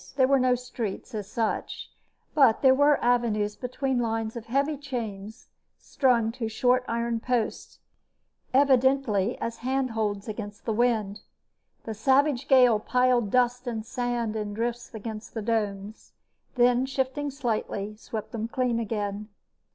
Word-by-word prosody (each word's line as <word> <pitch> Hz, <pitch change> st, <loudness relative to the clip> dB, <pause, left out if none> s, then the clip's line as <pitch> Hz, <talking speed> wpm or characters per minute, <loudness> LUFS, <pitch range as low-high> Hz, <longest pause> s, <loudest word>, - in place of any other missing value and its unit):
There 260 Hz, -2 st, +4 dB
were 275 Hz, 0 st, +4 dB
no 250 Hz, 0 st, +3 dB
streets, 240 Hz, -5 st, -5 dB
as 210 Hz, -2 st, -5 dB
such, 225 Hz, -1 st, -3 dB, 0.4 s
but 270 Hz, -7 st, +4 dB
there 260 Hz, -1 st, +7 dB
were 285 Hz, +1 st, +4 dB
avenues 220 Hz, -4 st, +1 dB
between 255 Hz, 0 st, -2 dB
lines 225 Hz, -1 st, -2 dB
of 230 Hz, -2 st, -7 dB
heavy 280 Hz, +5 st, +1 dB
chains 230 Hz, -6 st, -6 dB, 0.3 s
strung 235 Hz, -5 st, +1 dB
to 225 Hz, -2 st, -4 dB
short 250 Hz, +3 st, +2 dB
iron 235 Hz, 0 st, -1 dB
posts, 240 Hz, -2 st, -2 dB, 0.7 s
evidently 260 Hz, -5 st, +3 dB
as 230 Hz, 0 st, -4 dB
handholds 225 Hz, -6 st, -2 dB
against 210 Hz, -1 st, -7 dB
the 225 Hz, -, 0 dB
wind. 215 Hz, -3 st, +1 dB, 0.6 s
The 225 Hz, -, -5 dB
savage 270 Hz, +4 st, +2 dB
gale 250 Hz, -5 st, +6 dB
piled 250 Hz, -1 st, +2 dB
dust 250 Hz, +2 st, +1 dB
and 220 Hz, -2 st, -3 dB
sand 240 Hz, -2 st, -2 dB
in 210 Hz, -1 st, -3 dB
drifts 235 Hz, +1 st, -3 dB
against 220 Hz, +1 st, -7 dB
the 225 Hz, -, -2 dB
domes, 210 Hz, -2 st, -3 dB, 0.4 s
then, 245 Hz, +1 st, +3 dB
shifting 270 Hz, +2 st, -2 dB
slightly, 220 Hz, -6 st, -3 dB
swept 215 Hz, 0 st, -7 dB
them 225 Hz, -1 st, -3 dB
clean 245 Hz, -1 st, 0 dB
again. 210 Hz, -1 st, -3 dB
235 Hz, 135 wpm, -27 LUFS, 220-255 Hz, 0.7 s, there